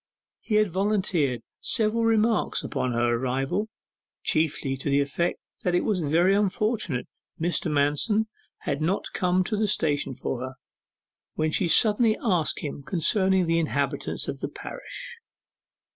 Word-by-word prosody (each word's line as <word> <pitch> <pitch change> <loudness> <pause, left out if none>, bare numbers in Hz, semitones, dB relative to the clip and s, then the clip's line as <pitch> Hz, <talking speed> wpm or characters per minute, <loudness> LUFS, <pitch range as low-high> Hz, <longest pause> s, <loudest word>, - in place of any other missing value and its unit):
He 215 - -2
had 210 -3 +3
volunteered 185 - 0 0.2
several 225 +1 +1
remarks 225 0 +2
upon 130 -1 -2
her 120 0 +2
arrival, 135 - -1 0.5
chiefly 155 -4 0
to 135 - -3
the 140 0 +3
effect 145 +5 -1 0.2
that 180 -1 0
it 175 - +2
was 210 -5 0
very 170 +5 +3
unfortunate 205 - 0 0.3
Mr. 170 0 0
Manston 150 +10 +2 0.4
had 140 - -2
not 180 +6 -1
come 180 0 +2
to 215 - -2
the 215 0 +1
station 145 -9 0
for 130 -1 -3
her, 130 +1 -5 0.8
when 155 0 0
she 180 - +1
suddenly 215 +6 +4
asked 180 -9 +1
him 145 -1 -5
concerning 190 +4 +2
the 165 0 +2
inhabitants 145 -3 -1
of - - -4
the - - -3
parish. - - -8
175 Hz, 145 wpm, -26 LUFS, 145-210 Hz, 0.8 s, suddenly